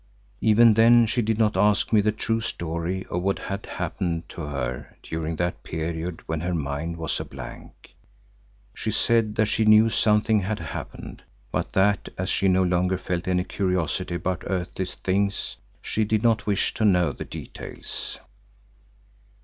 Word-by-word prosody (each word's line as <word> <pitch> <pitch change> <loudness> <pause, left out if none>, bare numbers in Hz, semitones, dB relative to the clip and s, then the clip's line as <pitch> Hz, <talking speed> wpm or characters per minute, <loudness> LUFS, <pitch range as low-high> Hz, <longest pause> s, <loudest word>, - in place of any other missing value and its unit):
Even 110 +1 +6
then 115 +2 +6
she 120 +2 0
did 110 -1 0
not 110 -1 +2
ask 105 +3 +2
me 105 - +6
the 105 +1 +2
true 115 +1 -1
story 85 -1 -3
of 90 - -1
what 95 +1 0
had 100 +1 -5
happened 85 -2 -3
to - - -8
her 70 -4 -4
during 80 0 -3
that 85 +2 -2
period 80 +1 -4
when 80 0 -2
her 90 +2 -2
mind 80 +2 -3
was 80 -2 -1
a - - -2
blank. - - -11 0.8
She - - -4
said 115 -2 +2
that 110 - +3
she 110 +1 +1
knew 110 +1 +6
something 110 0 +3
had 100 +2 -2
happened - - -7 0.3
but - - -2
that 100 +1 +2
as 95 +1 -1
she 95 - +2
no 95 0 +4
longer 90 +1 +1
felt 90 -1 -3
any 90 -1 +2
curiosity 90 -4 -1
about 90 0 -2
earthly 95 0 -2
things, 100 +2 -1 0.3
she 110 - 0
did 110 0 0
not 115 -3 +2
wish 100 -2 +1
to - - -2
know 90 -7 +4
the - - -7
details. - - -6
95 Hz, 165 wpm, -25 LUFS, 85-105 Hz, 0.8 s, Even